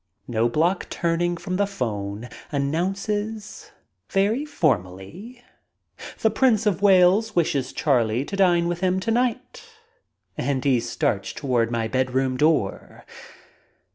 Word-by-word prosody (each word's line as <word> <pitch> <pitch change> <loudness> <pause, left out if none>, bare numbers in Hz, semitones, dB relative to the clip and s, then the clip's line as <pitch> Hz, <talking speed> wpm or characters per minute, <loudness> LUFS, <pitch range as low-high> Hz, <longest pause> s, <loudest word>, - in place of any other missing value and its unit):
Kjiobloch 125 - 0
turning 175 +1 -1
from 180 +2 -4
the 200 0 +1
phone 110 - -4 0.2
announces, 195 +9 -3 0.4
very 215 +9 +1
for 155 - +2
mally, 155 - -12 0.8
"The 220 - +3
Prince 225 -2 +2
of 200 -3 +1
Wales 200 +3 +4
wishes 140 -6 0
Charlie 125 -3 +1
to 200 - -5
dine 175 -3 +3
with 175 0 -2
him 185 0 +1
to 205 +4 -2
night, 245 0 -1 0.3
' 465 +1 -44
' - - -47
and 135 -2 -1
he 130 -3 +3
starts - - -2
toward 120 -4 0
my 115 -1 -1
bedroom 130 +1 0
door. 150 -8 0
170 Hz, 130 wpm, -23 LUFS, 130-200 Hz, 0.8 s, Wales